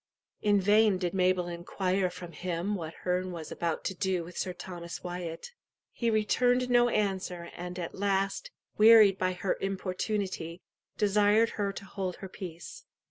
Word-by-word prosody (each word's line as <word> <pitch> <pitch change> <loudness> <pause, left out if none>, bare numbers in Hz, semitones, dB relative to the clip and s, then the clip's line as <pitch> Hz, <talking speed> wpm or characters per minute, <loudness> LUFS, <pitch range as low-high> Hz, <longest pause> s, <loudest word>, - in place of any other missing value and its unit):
In 205 -1 +4
vain 205 +1 +4
did 180 -2 -2
Mabel 185 -1 +2
inquire 185 +2 -1
from 180 -1 -9
him 180 +3 -3
what 165 -5 -5
Herne 180 0 0
was 165 -3 -7
about 165 -2 -2
to 190 - -2
do 185 -1 -1
with 175 +2 -11
Sir 185 - -2
Thomas 175 -1 -8
Wyat. 175 - -5 0.4
He 235 - -1
returned 245 +3 +2
no 240 0 +5
answer, 190 -5 -2
and 180 +1 -6
at 170 -2 -4
last, 195 - -1 0.3
wearied 215 -3 +8
by 185 0 +1
her 180 +1 -1
importunity, 190 -2 -3 0.3
desired 210 +2 +4
her 200 -2 -1
to 200 - -8
hold 185 -2 -4
her 190 - -8
peace. 180 - -8
185 Hz, 155 wpm, -30 LUFS, 180-205 Hz, 0.4 s, wearied